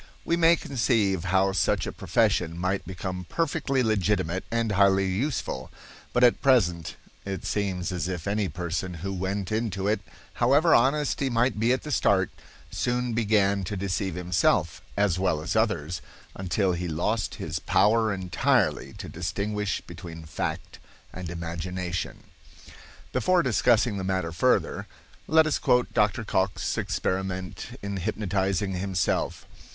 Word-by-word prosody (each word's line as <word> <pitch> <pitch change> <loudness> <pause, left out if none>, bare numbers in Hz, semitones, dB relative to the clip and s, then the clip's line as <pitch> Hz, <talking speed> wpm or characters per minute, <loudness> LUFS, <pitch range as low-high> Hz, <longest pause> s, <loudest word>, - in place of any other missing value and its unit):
We 170 - +2
may 170 0 +5
conceive 110 - 0
how 95 +2 +3
such 95 - +1
a - - -3
profession 80 +1 +1
might 95 +2 -1
become 90 0 -5
perfectly 150 -5 0
legitimate 95 -4 0
and 115 -2 0
highly 100 -1 +4
useful; 95 - -2 0.4
but 125 - +2
at 120 - +5
present 90 - +2 0.3
it 95 -1 -5
seems 95 -4 -1
as 90 -2 -2
if 90 -3 -4
any 100 -1 0
person 90 +1 -3
who 95 - -2
went 95 +1 -3
into 105 -3 -1
it, 105 -1 +1 0.4
however 145 +7 +5
honest 140 +4 +3
he 135 - 0
might 115 -2 +1
be 115 +3 +3
at 130 - 0
the 150 - -5
start, 100 -6 +2 0.4
soon 125 -1 -1
began 100 -3 +2
to 100 +3 -4
deceive 95 -1 -2
himself 90 -1 +1 0.2
as 100 -3 +2
well 90 -5 +1
as 80 +7 -3
others, 90 -7 0 0.3
until 95 +1 0
he 90 +1 -3
lost 105 +8 -1
his - - -4
power 110 +1 +3
entirely 95 -2 +1
to - - -8
distinguish 100 +4 -2
between 85 -2 -9
fact 75 -1 -4 0.3
and 90 -2 -6
imagination. 85 +1 -4 0.9
Before 185 -1 +3
discussing 120 -3 +3
the 95 - -3
matter 95 -3 -1
further, 80 - +1 0.4
let 160 0 +5
us 155 - 0
quote 125 0 +2
Dr. 105 +1 +2
Cocke's 95 -2 0
experiment 95 -1 -3
in 100 -1 -3
hypnotizing 95 0 -1
himself. 90 -2 -1
95 Hz, 140 wpm, -26 LUFS, 90-115 Hz, 0.9 s, may